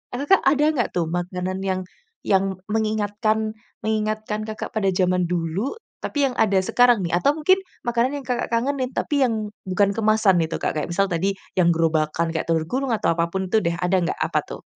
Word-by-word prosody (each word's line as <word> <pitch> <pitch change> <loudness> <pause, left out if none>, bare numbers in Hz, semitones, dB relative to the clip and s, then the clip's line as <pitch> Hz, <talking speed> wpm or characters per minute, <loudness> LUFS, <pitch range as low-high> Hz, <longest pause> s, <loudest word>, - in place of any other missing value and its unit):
eee, - - -4
Kakak 385 +6 +5
ada 290 +2 +4
nggak 245 -7 0
tuh 175 -2 +1
makanan 180 +1 -3
yang 190 -1 -1 0.5
yang 195 -1 +2
mengingatkan 215 0 0 0.3
mengingatkan 215 0 -1
Kakak 215 0 -5
pada 200 -3 +2
jaman 180 -1 +1
dulu? 175 - -2 0.3
Tapi 285 -2 +1
yang 250 - -7
ada, 195 -3 +3
sekarang 245 +2 +4
nih 170 - -3
atau 230 +11 +3
mungkin 370 +5 +4 0.3
makanan 240 +4 +1
yang - - -16
Kakak 245 -2 -1
kangenin, 255 +2 0
tapi 285 -2 +1
yang 220 -3 -2 0.2
bukan 195 +2 +2
kemasan 215 -4 +3
itu 160 - -3
Kak? - - -1
Kayak, 150 - -2
misal, 195 +2 +2
tadi 185 +3 0 0.2
yang 175 -2 +4
gerobakan, 160 0 +1
kayak, 160 - -2
telur 160 -1 +1
gulung 265 +2 -1
atau 215 - +1
apa 170 0 +1
pun 190 0 -2
itu 220 - +3
deh, 170 0 0
ada 180 +1 +2
nggak? 170 - -1
Apa - - +1
tuh? - - -9
205 Hz, 195 wpm, -23 LUFS, 180-230 Hz, 0.5 s, Kakak